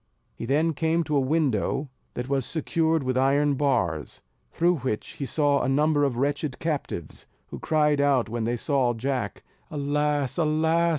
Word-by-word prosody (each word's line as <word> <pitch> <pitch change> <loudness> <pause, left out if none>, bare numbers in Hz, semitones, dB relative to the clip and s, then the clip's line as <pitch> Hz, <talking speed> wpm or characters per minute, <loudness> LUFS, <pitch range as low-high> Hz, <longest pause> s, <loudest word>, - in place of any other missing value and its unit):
He 115 - -7
then 155 +5 +2
came 160 +3 +1
to 150 -1 -2
a - - +4
window 135 -1 0 0.2
that 125 +1 -4
was 135 -1 0
secured 160 +1 0
with 130 0 0
iron 140 +2 +3
bars, 85 - -1 0.3
through 175 +1 +2
which 125 -5 -3
he 140 - -5
saw 145 -1 +2
a - - 0
number 145 +2 +2
of 135 -4 0
wretched 145 +1 -1
captives, 145 - -4 0.2
who - - -7
cried 150 -2 +2
out 140 -4 +3
when 115 0 -3
they 120 +1 0
saw 130 -2 +1
Jack, 125 -3 -3 0.3
"Alas! 145 -1 -1
alas! 160 +2 +2
145 Hz, 165 wpm, -26 LUFS, 130-155 Hz, 0.3 s, a